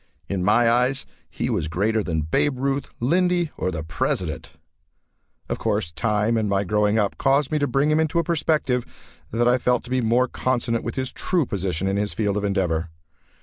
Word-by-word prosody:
In 95 -2 -2
my 110 +4 +4
eyes 125 +3 +2 0.2
he - - -3
was 80 - -1
greater 105 +7 0
than 80 -4 -1
Babe 125 - +1
Ruth, 135 +1 -1
Lindy, 175 +5 +1
or 90 - -1
the 80 -4 -4
President. 80 +1 -3 0.9
Of - - -3
course, 80 - -1
time, 105 +4 0
and 110 -2 0
my 100 0 +1
growing 105 +2 +1
up 105 -2 0
caused 140 +1 +2
me 155 - +1
to 145 - +1
bring 140 +4 +2
him 155 - +3
into 160 +1 0
a 170 - +3
perspective 150 -6 0 0.5
that 120 +2 +1
I 125 +1 +4
felt 125 -1 +1
to 125 - -11
be 130 0 +2
more 120 +3 +2
consonant 120 -3 -1
with - - -4
his 130 -1 -2
true 175 -5 0
position 95 -3 -2
in 95 +1 0
his 105 0 -1
field 105 -3 0
of 105 - -1
endeavor. 90 -5 0
115 Hz, 195 wpm, -23 LUFS, 100-135 Hz, 0.9 s, my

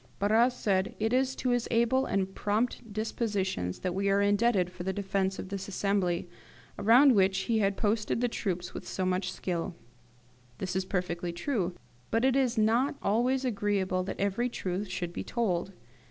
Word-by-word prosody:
Barras 225 +5 +3
said, 190 -5 0
"It 220 +2 0
is 265 +1 +2
to 255 - -2
his 245 -1 +1
able 235 +3 +2
and 190 -1 -1
prompt 220 +2 -1
dispositions 200 - -2
that 180 -1 -1
we 195 +2 0
are 195 0 +3
indebted 205 -2 +2
for 180 0 -9
the 190 +2 -1
defence 195 -1 -1
of 190 - -6
this 195 -1 -5
assembly, 190 -3 0 0.5
around 250 +6 +6
which 190 -2 +3
he 225 +2 +1
had 200 -1 +1
posted 215 +1 0
the 245 - +2
troops 180 -6 -3
with - - -7
so 185 - -2
much 185 0 0
skill." 180 -1 -3 0.8
This 185 -1 -4
is 190 0 0
perfectly 180 -2 -2
true, 180 -1 -2 0.3
but 225 +3 +2
it 265 -1 +3
is 255 -3 +2
not 230 +6 +2
always 250 +6 +1
agreeable 200 -5 0
that - - -5
every 200 +5 0
truth 190 -2 -3
should 175 -2 -4
be - - -4
told. 195 -6 -1
200 Hz, 175 wpm, -29 LUFS, 185-230 Hz, 0.8 s, around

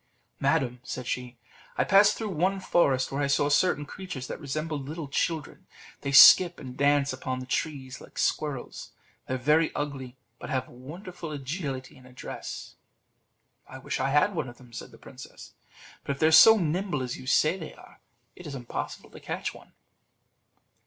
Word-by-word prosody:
"Madam," 135 -3 +1
said 125 0 -6
she, 125 0 -4 0.4
"I - - +3
passed 205 +1 +5
through 220 -3 -4
one 185 +4 0
forest 140 -8 +1
where 140 +1 -2
I 140 - +1
saw 145 +1 +2
certain 145 0 +2
creatures 165 -6 -7
that - - -6
resembled 150 -1 -4
little 155 -1 -5
children: 155 +2 -3 0.3
they 140 - -3
skip 175 +5 +8
and 130 -3 -9
dance 140 0 +2
upon 130 0 -4
the 130 - -6
trees 135 -1 -4
like - - -15
squirrels; 145 -5 -2 0.3
they 130 - -2
are - - -1
very 150 +5 +2
ugly, 135 -3 -5 0.2
but - - -8
have 130 -1 -1
wonderful 165 +6 -9
agility 140 -2 -5
and 130 - -17
address." 125 0 -8 0.9
"I 130 - -10
wish 130 - -4
I 135 - 0
had 150 +8 +3
one 130 -8 -3
of 120 - -13
them," 125 -2 -17
said - - -8
the - - -16
princess; - - -13 0.5
"but 140 - -2
if 135 - -11
they - - +3
are 160 - +4
so 220 +8 +9
nimble 175 -4 -1
as 125 -1 -5
you 130 - -11
say 155 +6 +3
they 160 - -8
are, - - -17 0.4
it 180 - -11
is 140 - -6
impossible 120 -2 -6
to - - -12
catch - - -4
one." - - -16
140 Hz, 180 wpm, -27 LUFS, 130-165 Hz, 0.9 s, so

